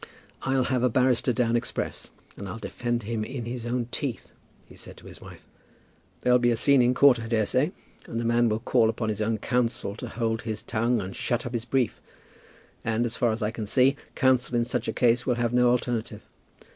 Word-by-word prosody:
"I'll 135 -1 +1
have 125 -1 0
a 125 - +3
barrister 125 +1 +2
down 120 0 +1
express, 120 +1 -3 0.3
and 100 - -7
I'll 105 - -6
defend 120 +1 -3
him 110 +1 -3
in 125 +1 -5
his 120 0 -5
own 120 0 -1
teeth," 135 -5 -3 0.3
he - - -16
said - - -11
to - - -16
his - - -11
wife. - - -13 0.8
"There'll 125 0 +4
be 120 0 +3
a 115 - +1
scene 140 +2 +5
in 125 +1 +3
court, 135 -3 +6
I 115 - -6
daresay, 115 - +1 0.4
and 115 - -4
the 115 - -2
man 120 0 +3
will 110 - 0
call 120 -2 +3
upon 110 -1 -2
his 110 0 -2
own 110 +1 0
counsel 115 -3 -1
to 125 - -6
hold 115 -1 -2
his 110 -2 -4
tongue 115 +2 0
and 95 0 -7
shut 120 -1 -1
up 120 - -5
his 115 -1 -3
brief; 125 -3 0 0.8
and, 115 +1 0
as 115 0 -3
far 120 - +1
as 110 +1 -3
I 105 - 0
can 110 -2 -6
see, 130 +5 +4 0.2
counsel 130 -2 +2
in 120 0 +2
such - - -2
a - - 0
case 120 +1 +2
would 125 -2 +1
have 120 -1 0
no 125 0 +4
alternative. 120 -2 -2
120 Hz, 220 wpm, -26 LUFS, 115-125 Hz, 0.8 s, court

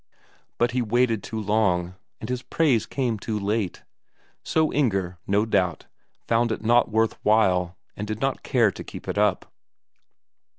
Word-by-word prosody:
But 120 +1 +2
he 125 0 0
waited 115 -1 +1
too 110 +3 -5
long, 100 -5 +1 0.3
and 110 - -6
his 125 0 -2
praise 135 -7 +1
came 120 -6 -1
too 110 +1 -3
late. 100 -2 -2 0.6
So 160 -1 +1
Inger, 95 - 0
no 100 +2 +2
doubt, 95 -7 0 0.4
found 115 0 +2
it 110 - -3
not 120 +1 +4
worth 110 0 +1
while, 95 -5 +2 0.2
and 105 - -5
did 110 0 -4
not 135 +1 -1
care 120 -6 +2
to - - -9
keep - - -10
it - - -1
up. 105 -3 0
110 Hz, 160 wpm, -24 LUFS, 100-120 Hz, 0.6 s, not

